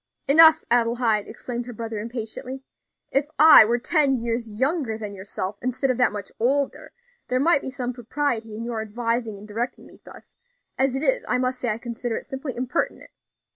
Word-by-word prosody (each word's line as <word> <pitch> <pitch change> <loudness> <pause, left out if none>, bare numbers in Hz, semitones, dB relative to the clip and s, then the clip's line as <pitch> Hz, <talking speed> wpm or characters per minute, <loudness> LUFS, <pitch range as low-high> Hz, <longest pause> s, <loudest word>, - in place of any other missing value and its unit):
"Enough, 320 +2 +7
Adelaide!" 235 -3 +2
exclaimed 240 -1 -6
her 245 - -7
brother, 225 -1 -5
impatiently. 235 +4 -6 0.5
"If 275 +2 +1
I 310 -7 +9
were 235 +2 +1
ten 280 +2 +2
years 235 -2 -2
younger 260 +1 -1
than 210 -2 -6
yourself, 195 0 -5
instead 255 +2 0
of 250 - -3
that 250 - +3
much 205 -1 -7
older, 275 +4 -1 0.4
there 255 - 0
might 285 0 +3
be - - -5
some 250 -1 -4
propriety 240 -2 -3
in 230 +2 -6
your 235 -2 -3
advising 230 0 -2
and 205 +2 -12
directing 235 +4 -4
me - - -16
thus; - - -15 0.4
as 265 0 +1
it 270 - -2
is, - - +2
I - - +2
must 255 0 -1
say 250 - -1
I 215 - 0
consider 235 0 -4
it - - -5
simply 265 -1 -6
impertinent." 255 +6 -3
245 Hz, 185 wpm, -24 LUFS, 225-265 Hz, 0.5 s, I